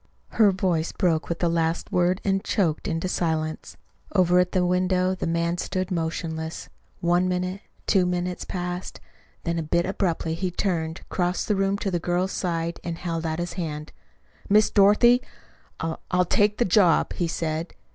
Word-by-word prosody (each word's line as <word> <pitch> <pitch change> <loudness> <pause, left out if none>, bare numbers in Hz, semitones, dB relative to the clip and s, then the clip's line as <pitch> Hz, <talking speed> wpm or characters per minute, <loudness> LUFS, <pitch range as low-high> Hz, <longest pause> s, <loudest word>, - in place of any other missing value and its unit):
Her 215 -3 +4
voice 180 -4 0
broke 170 -4 0
with 170 - -1
the 175 - +1
last 165 0 0
word 180 +1 +2
and 195 -1 +1
choked 165 -7 0
into 165 +2 -1
silence. 160 -3 -2 0.4
Over 180 -1 +4
at 180 0 +2
the 185 -2 +2
window 185 +1 +2
the 185 - -3
man 170 +1 0
stood 185 0 -2
motionless. 160 -1 -3 0.3
One 175 +1 +2
minute, 180 +2 -2 0.2
two 185 -3 +3
minutes 180 0 -2
passed. 180 0 -5 0.4
Then 170 -1 -1
a - - 0
bit 170 +2 +1
abruptly 175 -4 -1
he 180 +3 -2
turned, 170 -3 -2
crossed 180 0 -1
the 210 - +2
room 195 +1 +1
to 200 -1 -2
the 175 - 0
girl's 180 +3 0
side, 170 -2 -2
and 170 -1 -4
held 165 -2 -3
out 160 0 -2
his 175 0 -3
hand. 155 -4 -5 0.6
"Miss 210 +1 +5
Dorothy, 215 +5 +5 0.6
I 165 0 -2
I'll 180 0 +2
take 205 +4 +2
the 240 - +2
job," 185 -2 +4
he 175 - -1
said. 160 0 -3
175 Hz, 170 wpm, -25 LUFS, 165-185 Hz, 0.6 s, Miss